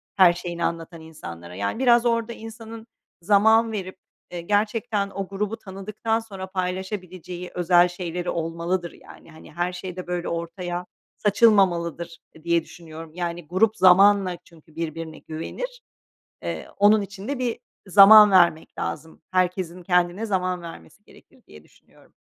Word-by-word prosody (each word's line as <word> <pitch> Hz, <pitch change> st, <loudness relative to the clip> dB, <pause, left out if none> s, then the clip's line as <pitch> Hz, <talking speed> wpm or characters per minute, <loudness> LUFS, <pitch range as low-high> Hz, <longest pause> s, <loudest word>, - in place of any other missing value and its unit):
her 185 Hz, -3 st, +6 dB
şeyini 175 Hz, -1 st, -5 dB
anlatan 165 Hz, 0 st, -5 dB
insanlara 90 Hz, -, -10 dB
yani 100 Hz, -, -3 dB
biraz 240 Hz, -2 st, +4 dB
orada 230 Hz, 0 st, 0 dB
insanın 225 Hz, 0 st, -10 dB, 0.3 s
zaman 220 Hz, +4 st, +4 dB
verip, 190 Hz, -3 st, -5 dB, 0.3 s
eee, 175 Hz, -1 st, -5 dB
gerçekten 210 Hz, +2 st, 0 dB
o 195 Hz, -1 st, -5 dB
grubu 205 Hz, +3 st, -3 dB
tanıdıktan 215 Hz, +2 st, -3 dB
sonra 195 Hz, -4 st, -8 dB
paylaşabileceği 185 Hz, -1 st, -5 dB
özel 175 Hz, 0 st, +4 dB
şeyleri 175 Hz, 0 st, -5 dB
olmalıdır, 170 Hz, +2 st, -2 dB
yani, -, -, -16 dB
hani, 160 Hz, -, -15 dB
her 175 Hz, +2 st, -2 dB
şeyde 180 Hz, 0 st, -7 dB
böyle 175 Hz, 0 st, -3 dB
ortaya 175 Hz, +1 st, -4 dB, 0.3 s
saçılmamalıdır, 175 Hz, -6 st, +2 dB, 0.2 s
eee, 160 Hz, -, -17 dB
diye 170 Hz, -1 st, +1 dB
düşünüyorum. 160 Hz, -1 st, -11 dB
Yani, 175 Hz, -2 st, -5 dB
grup 210 Hz, +6 st, +2 dB
zamanla 190 Hz, -1 st, +5 dB
çünkü 160 Hz, -1 st, -21 dB
birbirine 165 Hz, -1 st, -5 dB
güvenir. 480 Hz, -, -7 dB, 0.6 s
Eee, -, -, -5 dB
onun 210 Hz, +2 st, +5 dB
için 200 Hz, +2 st, -9 dB
de 280 Hz, -1 st, -2 dB
bir 245 Hz, -2 st, -2 dB, 0.3 s
zaman 210 Hz, +2 st, +9 dB
vermek 170 Hz, -4 st, +3 dB
lazım, 160 Hz, +2 st, -6 dB
herkesin 185 Hz, -1 st, -1 dB
kendine 180 Hz, +4 st, +1 dB
zaman 185 Hz, -3 st, -1 dB
vermesi 85 Hz, -, -12 dB
gerekir -, -, -21 dB
diye 75 Hz, 0 st, -15 dB
düşünüyorum. -, -, -25 dB
180 Hz, 135 wpm, -24 LUFS, 170-205 Hz, 0.6 s, zaman